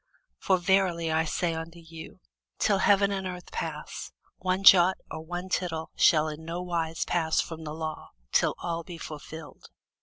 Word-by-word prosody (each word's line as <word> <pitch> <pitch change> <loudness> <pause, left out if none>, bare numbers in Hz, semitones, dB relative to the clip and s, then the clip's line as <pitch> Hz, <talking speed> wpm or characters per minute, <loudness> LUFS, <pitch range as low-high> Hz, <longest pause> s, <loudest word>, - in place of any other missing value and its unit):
For 190 - +3
verily 180 -3 +2
I 160 +1 +2
say 170 +1 -1
unto 165 +1 -6
you, 165 -1 -11 0.4
Till 200 -2 +2
heaven 200 0 +4
and 190 -1 -2
earth 180 -1 -8
pass, - - -5 0.3
one 185 +1 -1
jot 185 -1 +8
or - - -5
one 175 +3 -5
tittle 170 -4 -2
shall 155 -2 +5
in 155 +1 -6
no 165 +2 -4
wise 165 -2 -2
pass 160 -2 +1
from 160 -1 -3
the 150 0 -5
law, 155 -1 -5 0.2
till - - +3
all 170 -1 -3
be 170 0 -9
fulfilled. 155 0 -9
170 Hz, 170 wpm, -28 LUFS, 160-185 Hz, 0.4 s, jot